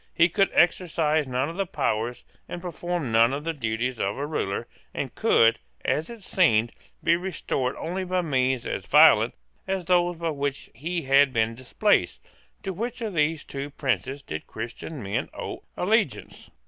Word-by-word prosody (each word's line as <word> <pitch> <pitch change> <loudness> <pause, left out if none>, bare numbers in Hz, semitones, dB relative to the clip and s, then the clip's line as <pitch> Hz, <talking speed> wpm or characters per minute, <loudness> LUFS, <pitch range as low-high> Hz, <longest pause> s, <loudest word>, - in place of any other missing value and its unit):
He 170 +1 +5
could 195 +3 +2
exercise 160 -4 +2
none 130 +2 0
of 165 +3 -7
the 195 -1 -1
powers 115 -4 -2 0.2
and 175 - -5
perform 175 -5 -3
none 115 +3 +5
of 145 +1 -3
the 165 +1 -2
duties 120 -2 -2
of 100 +1 -1
a 140 - -2
ruler, 125 -10 -2 0.3
and - - -3
could, 115 0 +4 0.3
as 155 - 0
it 230 -4 -10
seemed, 120 - +3 0.3
be 170 - +4
restored 170 -7 -2
only 180 +4 -3
by 185 0 0
means 130 -5 +1
as - - -4
violent - - +6 0.3
as 190 -2 -2
those 175 -1 +2
by 165 -1 -1
which 140 -1 -3
he 165 +7 -3
had 135 0 +5
been 115 -2 +1
displaced, 130 - +1 0.4
to 195 -2 -3
which 230 +8 -4
of 220 -3 -3
these 155 -1 +1
two 140 +1 -6
princes 140 -1 -2
did 80 - -6
Christian 120 +5 -6
men 100 0 -2
owe - - -6
allegiance? - - 0
150 Hz, 170 wpm, -26 LUFS, 125-175 Hz, 0.4 s, violent